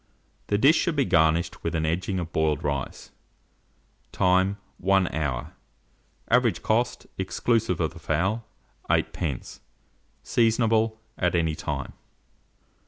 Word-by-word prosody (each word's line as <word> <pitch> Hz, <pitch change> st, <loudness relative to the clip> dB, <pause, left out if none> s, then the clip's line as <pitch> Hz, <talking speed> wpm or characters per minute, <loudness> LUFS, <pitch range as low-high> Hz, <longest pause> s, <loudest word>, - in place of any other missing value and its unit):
The 105 Hz, -, +1 dB
dish 140 Hz, +9 st, +5 dB
should 170 Hz, -3 st, 0 dB
be 140 Hz, -2 st, +2 dB
garnished 85 Hz, -1 st, +2 dB
with 85 Hz, -, -2 dB
au 80 Hz, -, 0 dB
edging 90 Hz, +5 st, -1 dB
of 85 Hz, -2 st, -4 dB
boiled 75 Hz, -2 st, +1 dB
rice. 70 Hz, -2 st, -4 dB, 1.0 s
Time. 95 Hz, +2 st, +2 dB, 0.2 s
1 95 Hz, -1 st, +2 dB
hour. 70 Hz, -6 st, -2 dB, 0.8 s
Average -, -, +3 dB
cost, 120 Hz, +3 st, 0 dB
exclusive 105 Hz, 0 st, 0 dB
of 80 Hz, -3 st, -1 dB
the -, -, -11 dB
fowl, 95 Hz, +9 st, 0 dB, 0.5 s
8d. 75 Hz, -8 st, -1 dB, 0.6 s
Seasonable 115 Hz, -1 st, +2 dB, 0.2 s
at 90 Hz, -1 st, +1 dB
any 80 Hz, -2 st, +1 dB
time. -, -, -4 dB
90 Hz, 115 wpm, -26 LUFS, 80-110 Hz, 1.0 s, dish